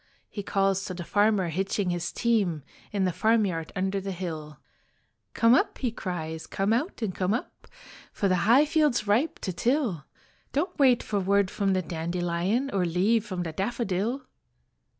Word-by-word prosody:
He 205 Hz, -, -4 dB
calls 195 Hz, -1 st, +1 dB
to 185 Hz, -3 st, -5 dB
the 175 Hz, -, -5 dB
farmer 205 Hz, -1 st, +2 dB
hitching 190 Hz, +2 st, -1 dB
his 175 Hz, 0 st, -2 dB
team 200 Hz, -, +1 dB, 0.3 s
In 200 Hz, -2 st, 0 dB
the 185 Hz, -, +1 dB
farmyard 200 Hz, -6 st, +1 dB
under 190 Hz, +1 st, -1 dB
the 195 Hz, 0 st, -4 dB
hill. 160 Hz, -5 st, -6 dB, 0.8 s
"Come 230 Hz, +1 st, +5 dB
up," -, -, +2 dB
he 250 Hz, -4 st, -1 dB
cries, 160 Hz, -6 st, -5 dB
"come 195 Hz, +3 st, 0 dB
out 250 Hz, -, -1 dB
and 195 Hz, -4 st, -1 dB
come 185 Hz, +4 st, 0 dB
up, 245 Hz, -, -7 dB, 0.4 s
For 200 Hz, -, 0 dB
the 185 Hz, -1 st, +2 dB
high 270 Hz, +6 st, +7 dB
field's 300 Hz, -7 st, +2 dB
ripe 230 Hz, +10 st, +1 dB
to 185 Hz, -, -3 dB
till. 225 Hz, -, 0 dB, 0.5 s
Don't 335 Hz, +4 st, -1 dB
wait 255 Hz, -4 st, +5 dB
for 205 Hz, -2 st, -1 dB
word 195 Hz, 0 st, +2 dB
from 195 Hz, -2 st, 0 dB
the 185 Hz, -1 st, 0 dB
dandelion 175 Hz, +9 st, -1 dB
Or 195 Hz, -2 st, +1 dB
leave 200 Hz, +6 st, +1 dB
from 185 Hz, -3 st, -3 dB
the 165 Hz, -, -4 dB
daffodil." 225 Hz, -, -2 dB
195 Hz, 170 wpm, -27 LUFS, 180-230 Hz, 0.8 s, high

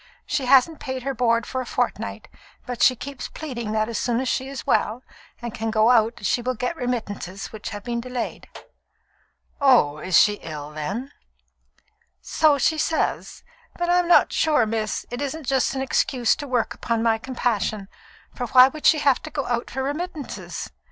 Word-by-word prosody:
She 265 Hz, -3 st, -2 dB
hasn't 275 Hz, +4 st, +5 dB
paid 260 Hz, -2 st, -5 dB
her 275 Hz, +1 st, -2 dB
board 235 Hz, -2 st, +1 dB
for 260 Hz, -, -3 dB
a -, -, -6 dB
fortnight, -, -, -2 dB, 0.4 s
but 245 Hz, -1 st, -5 dB
she 255 Hz, -, +6 dB
keeps 275 Hz, +2 st, -7 dB
pleading 235 Hz, -8 st, -6 dB
that 215 Hz, 0 st, +1 dB
as 230 Hz, -2 st, -3 dB
soon 240 Hz, -1 st, 0 dB
as 260 Hz, -, -2 dB
she 260 Hz, +1 st, -1 dB
is 275 Hz, -2 st, -7 dB
well, 230 Hz, +4 st, +1 dB, 0.4 s
and 235 Hz, -2 st, -4 dB
can 225 Hz, 0 st, -3 dB
go 220 Hz, +1 st, +4 dB
out, 225 Hz, -3 st, +2 dB
she 240 Hz, -, +1 dB
will 255 Hz, +1 st, -2 dB
get 250 Hz, +8 st, -2 dB
remittances 210 Hz, -, -4 dB
which 215 Hz, -1 st, -7 dB
have 205 Hz, -2 st, -7 dB
been 235 Hz, +1 st, -3 dB
delayed." 250 Hz, -1 st, -5 dB, 1.1 s
"Oh, 190 Hz, -, +4 dB
she 205 Hz, +4 st, +6 dB
is 165 Hz, -, -10 dB
ill, 150 Hz, -1 st, -7 dB
then?" 195 Hz, -, -4 dB, 1.1 s
"So 305 Hz, -2 st, +3 dB
she 310 Hz, +4 st, +1 dB
says. 320 Hz, +1 st, -1 dB, 0.3 s
But 345 Hz, 0 st, 0 dB
I'm 355 Hz, 0 st, +3 dB
not 350 Hz, -, +5 dB
sure, 300 Hz, -7 st, +3 dB
miss, 215 Hz, -1 st, -2 dB
it 245 Hz, +3 st, -4 dB
isn't 290 Hz, +2 st, -4 dB
just 265 Hz, +1 st, +1 dB
an 265 Hz, -, -2 dB
excuse 250 Hz, -3 st, +1 dB
to 290 Hz, -, -6 dB
work 250 Hz, -3 st, 0 dB
upon 230 Hz, -1 st, -2 dB
my 225 Hz, -1 st, +2 dB
compassion, 220 Hz, -5 st, -2 dB, 0.5 s
for 245 Hz, -, -4 dB
why 255 Hz, +3 st, +7 dB
should 310 Hz, -, 0 dB
she 315 Hz, -, +6 dB
have 280 Hz, -3 st, +2 dB
to -, -, -8 dB
go 280 Hz, -3 st, -3 dB
out 240 Hz, -1 st, -2 dB
for 265 Hz, +1 st, -3 dB
remittances? 300 Hz, +1 st, -5 dB
245 Hz, 185 wpm, -23 LUFS, 225-275 Hz, 1.1 s, why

